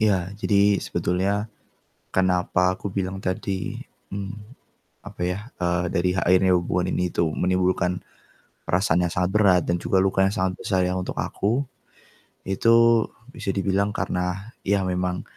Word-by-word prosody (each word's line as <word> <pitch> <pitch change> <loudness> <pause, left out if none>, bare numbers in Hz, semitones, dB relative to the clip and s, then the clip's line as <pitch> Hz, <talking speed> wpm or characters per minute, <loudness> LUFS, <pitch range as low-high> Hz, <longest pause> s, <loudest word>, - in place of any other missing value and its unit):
Ya, 95 -4 +1
jadi 100 -1 +3
sebetulnya 100 +4 -1 0.6
kenapa 90 0 +2
aku 100 - -6
bilang 95 0 -2
tadi, 95 0 -3 0.3
mmm, 100 +1 -5 0.7
apa - - -9
ya, 90 +2 -1 0.2
eee, 90 0 +1
dari 90 0 +1
akhirnya 95 +1 +4
hubungan 90 +1 -1
ini 90 -1 -1
tuh 85 - +1
menimbulkan 90 -1 +1 0.7
perasaan 90 -2 +2
yang 85 - -3
sangat 90 +1 0
berat 100 -4 +5
dan 85 0 0
juga 95 +2 +2
luka 95 0 0
yang 100 - -2
sangat 95 -3 0
besar 95 -2 0
ya 90 0 0
untuk 90 - -4
aku, 115 +7 -1 0.8
itu 115 +3 +4 0.2
bisa 105 -7 -4
dibilang 100 +1 0
karena 90 +4 -2 0.2
ya 100 0 +2
memang 90 -1 -1
95 Hz, 140 wpm, -24 LUFS, 90-100 Hz, 0.8 s, berat